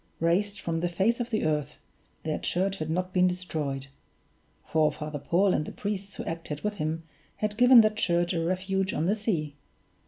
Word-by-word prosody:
Razed 195 +5 +1
from 165 -3 -2
the 175 +1 0
face 195 +8 +1
of 240 0 -2
the 215 -6 0
earth, 150 -1 -1 0.5
their 155 -1 -2
church 195 +2 0
had 155 0 -3
not 180 +3 -1
been 180 0 +4
destroyed 155 -7 -3 0.8
for 155 -1 +2
Father 150 0 -5
Paul 185 +6 +2
and 150 - +1
the - - -7
priests 200 -1 -4
who - - -6
acted 165 -3 -5
with 210 0 -2
him 155 +1 -2 0.3
had 210 -1 -2
given 245 +1 +8
that 215 -1 +1
church 175 -3 +2
a 165 -1 0
refuge 190 +2 -1
on 155 - 0
the 195 - +3
sea. 165 -10 -2
180 Hz, 190 wpm, -28 LUFS, 155-200 Hz, 0.8 s, given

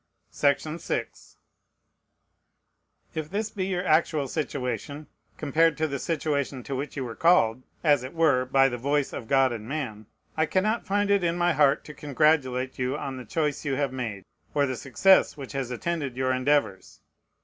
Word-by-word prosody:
If 155 +3 +1 2.5
this 210 +2 -2
be 190 -2 -3
your 180 -1 -2
actual 155 -3 +2
situation, 140 0 -4 0.3
compared 160 +1 +2
to 160 - +1
the 140 -2 -4
situation 145 -5 -2
to 140 - -4
which 140 +2 -5
you 135 - -2
were 115 -2 -6
called, 130 -8 +3 0.2
as 145 -5 +4
it 130 +5 -8
were 155 -6 +3
by 135 +1 +4
the 120 -2 -4
voice 140 +2 0
of 115 - -6
God 135 -1 +3
and 110 0 -7
man, 120 -8 -4 0.3
I 160 0 +1
cannot 215 +7 0
find 205 +1 +1
it 200 -2 +3
in 170 0 0
my 175 0 +2
heart 145 -1 +3
to 150 - -9
congratulate 140 -4 +1
you 130 +3 -1
on 135 -3 -5
the 125 - -8
choice 150 +4 -1
you 140 -3 -1
have 140 -1 -1
made, 110 -7 -5 0.3
or 145 -1 +3
the 130 -2 -2
success 155 +9 +3
which 135 -3 -8
has 135 -3 -3
attended 140 0 -3
your 130 0 +1
endeavors. 130 -6 0
140 Hz, 170 wpm, -26 LUFS, 130-160 Hz, 2.5 s, as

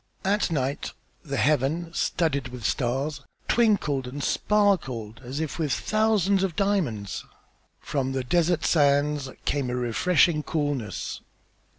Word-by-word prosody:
At 205 +1 +2
night 140 -3 -2 0.3
the - - -3
heaven, 155 +4 +1
studded 140 -7 0
with 125 -3 -8
stars, 135 +4 -1 0.3
twinkled 185 - +2
and 140 +3 -5
sparkled 135 - +1
as 130 +4 -5
if 160 0 -3
with 155 -4 0
thousands 210 -2 +2
of 190 -4 -1
diamonds. 150 - -1 0.6
From 135 -2 -2
the 130 -1 -1
desert 170 +3 +1
sands 145 -2 +2 0.2
came 140 -3 0
a 125 - -2
refreshing 150 +7 +2
coolness. 145 - -3
145 Hz, 120 wpm, -26 LUFS, 130-175 Hz, 0.6 s, At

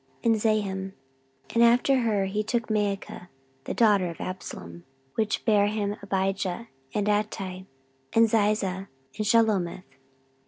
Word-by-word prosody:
14:011:020 210 -4 +1 0.6
And 235 - +5
after 245 +3 +4
her 215 -5 +1
he 200 +2 -1
took 230 +2 -2
Maachah 200 -3 -2 0.4
the - - -3
daughter 205 -5 +4
of 170 - -9
Absalom; 85 - -7 0.3
which 220 -1 -1
bare 205 -2 +4
him 205 -1 -1
Abijah, 195 +2 -2 0.2
and 205 +5 -1
Attai, 195 -3 -2 0.4
and 225 0 +5
Ziza, 205 -3 +1 0.3
and 215 - -2
Shelomith. 210 -6 +2
205 Hz, 120 wpm, -26 LUFS, 190-220 Hz, 0.6 s, And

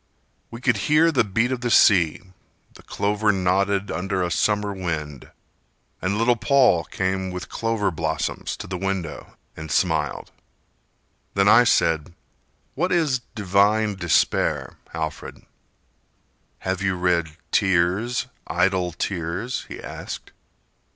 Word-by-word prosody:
We 115 - -9
could 125 -3 +2
hear 160 +2 +5
the 130 -6 +3
beat 115 +5 0
of 130 -2 -2
the 120 - -1
sea, 90 -8 +4 0.5
the - - -15
clover 105 +1 0
nodded 95 +1 0
Under 95 0 -1
a 90 - -2
summer 105 +2 +1
wind, 80 -7 -5 0.7
and 100 +3 -1
little 120 +2 +3
Paul 120 - +3
came 95 0 -2
With 90 0 -6
clover 115 -3 -1
blossoms 80 -1 -3
to - - -7
the 90 -1 -5
window 95 -4 -4 0.2
and 80 0 -8
smiled. 80 -4 0 1.0
Then 100 0 +3
I 120 +4 +7
said: 85 -5 +1 0.6
"What 180 - -1
is 155 -7 +2 0.2
'divine 105 +1 +2
despair,' 85 -4 +1 0.2
Alfred?" 80 -2 -6 1.2
"Have 95 0 -2
you 95 -1 0
read 85 -3 0
'Tears, 95 +5 +1 0.2
Idle 90 -1 +1
Tears'?" 90 +7 -3
he - - -8
asked. - - -8
95 Hz, 125 wpm, -23 LUFS, 85-110 Hz, 1.2 s, I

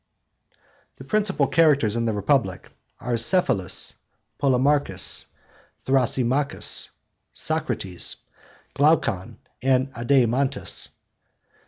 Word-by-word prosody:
The - - -12
principal 205 -9 0
characters 140 -8 +3
in 115 0 -1
the 110 - 0
Republic 100 -2 -1 0.3
are 120 -1 -2
Cephalus, 115 - +2 0.5
Polemarchus, 135 -6 +2 0.6
Thrasymachus, 130 +1 +1 0.4
Socrates, 90 -2 -1 0.6
Glaucon, 140 - +1 0.2
and 130 0 +1
Adeimantus. 130 +2 0
130 Hz, 70 wpm, -23 LUFS, 115-140 Hz, 0.6 s, characters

